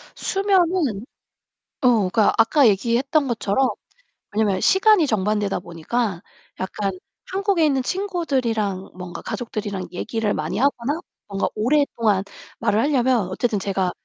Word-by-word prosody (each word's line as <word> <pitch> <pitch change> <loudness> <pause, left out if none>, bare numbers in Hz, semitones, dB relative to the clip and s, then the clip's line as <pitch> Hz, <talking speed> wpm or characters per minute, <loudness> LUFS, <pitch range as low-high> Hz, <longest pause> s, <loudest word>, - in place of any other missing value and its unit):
수면은 360 - +1 0.8
어, 250 - +4 0.2
그러니까 210 +3 +3
아까 240 +5 +5
얘기했던 250 +8 +1
것처럼 235 +2 +1 0.7
왜냐면 205 -4 +1
시간이 385 -4 +5
정반대다 210 -2 0
보니까 175 +3 -3 0.4
약간 195 +1 -2 0.4
한국에 385 -4 +2
있는 270 -3 +1
친구들이랑 255 - -1
뭔가 175 -2 -7
가족들이랑 205 -5 -4
얘기를 215 +3 -2
많이 160 +6 -3
하거나 280 +3 0 0.3
뭔가 200 -1 -1
오랫동안 230 -5 +1 0.4
말을 210 +2 +1
하려면 250 -6 +2
어쨌든 215 +2 -1
제가 190 -2 -1
230 Hz, 310 characters per minute, -22 LUFS, 195-285 Hz, 0.8 s, 아까